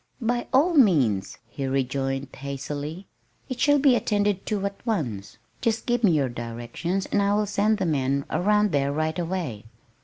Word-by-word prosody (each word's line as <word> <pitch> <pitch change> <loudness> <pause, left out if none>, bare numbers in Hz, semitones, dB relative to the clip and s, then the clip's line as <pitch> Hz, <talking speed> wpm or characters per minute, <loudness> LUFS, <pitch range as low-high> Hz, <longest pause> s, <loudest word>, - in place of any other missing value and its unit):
"By 240 0 -1
all 290 +7 +4
means," 145 - +3
he 135 +3 -4
rejoined 135 0 -1
hastily. 145 +5 -5 0.4
"It 255 -2 -4
shall 290 0 +4
be 275 -3 +5
attended 205 -4 0
to 205 -2 -1
at 200 0 -5
once. 120 - -3 0.2
Just 225 -1 0
give 240 -1 0
me 190 -6 +5
your 145 -4 +2
directions 120 +10 -4
and 205 - +1
I 200 0 +2
will 210 0 +1
send 210 +1 +1
the 190 - -1
men 140 -3 0
around 210 +1 +2
there 140 -2 +1
right 155 +3 -1
away." 170 - -3
175 Hz, 165 wpm, -25 LUFS, 135-210 Hz, 0.4 s, be